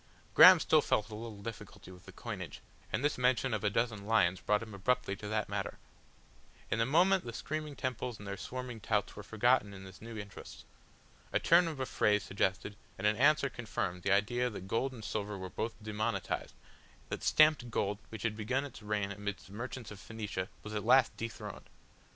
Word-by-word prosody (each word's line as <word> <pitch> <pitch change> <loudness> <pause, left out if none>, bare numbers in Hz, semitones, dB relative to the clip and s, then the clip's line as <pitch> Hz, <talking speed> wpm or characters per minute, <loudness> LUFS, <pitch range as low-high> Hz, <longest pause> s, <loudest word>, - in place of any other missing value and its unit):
Graham - - +10
still - - +4
felt 105 +1 0
a 105 -1 -7
difficulty 105 -3 -8
with 90 -1 -14
the - - -9
coinage, - - -7 0.3
and 140 - 0
this 145 - +1
mention 125 0 +2
of 105 - -1
a 105 - +3
dozen 110 -1 -1
lions 95 -5 +3
brought 105 +1 +1
him 110 -2 -10
abruptly 100 0 0
to 105 - -7
that 110 0 -1
matter. - - -3 0.9
In 110 - +2
a 115 - +2
moment 180 +6 +4
the 115 - -5
screaming 155 +3 -4
temples 125 -3 -3
and 100 - -10
their 100 - -3
swarming 125 +2 -6
touts 105 -1 -1
were 105 - -7
forgotten 110 -1 +2
in 95 - -10
this 95 -1 -12
new 115 0 -8
interest. 100 -2 -9 0.7
A - - +2
turn 170 +1 +5
of 155 -4 -5
a 130 - 0
phrase 105 -4 +2
suggested, 95 +1 -1 0.2
and 95 - -4
an 105 0 +4
answer 145 +4 +4
confirmed 100 -8 -3
the 95 - 0
idea 120 +5 +2
that 95 -4 -8
gold 130 +6 0
and 115 -4 -9
silver 105 -1 -3
were 95 -1 -6
both 115 +1 -3
demonetised, 110 0 -2 0.5
that - - -4
stamped 155 -5 +4
gold 105 -2 -1
which 110 -2 -7
had 115 -2 0
begun 125 +6 -1
its 140 - -10
reign 105 -1 -1
amidst 100 0 -5
the 95 - -14
merchants 120 +1 -6
of 105 - -9
Phoenicia 105 -2 -5
was 105 - -7
at 105 - -2
last 125 +2 +5
dethroned. 115 0 -7
110 Hz, 200 wpm, -33 LUFS, 100-125 Hz, 0.9 s, Graham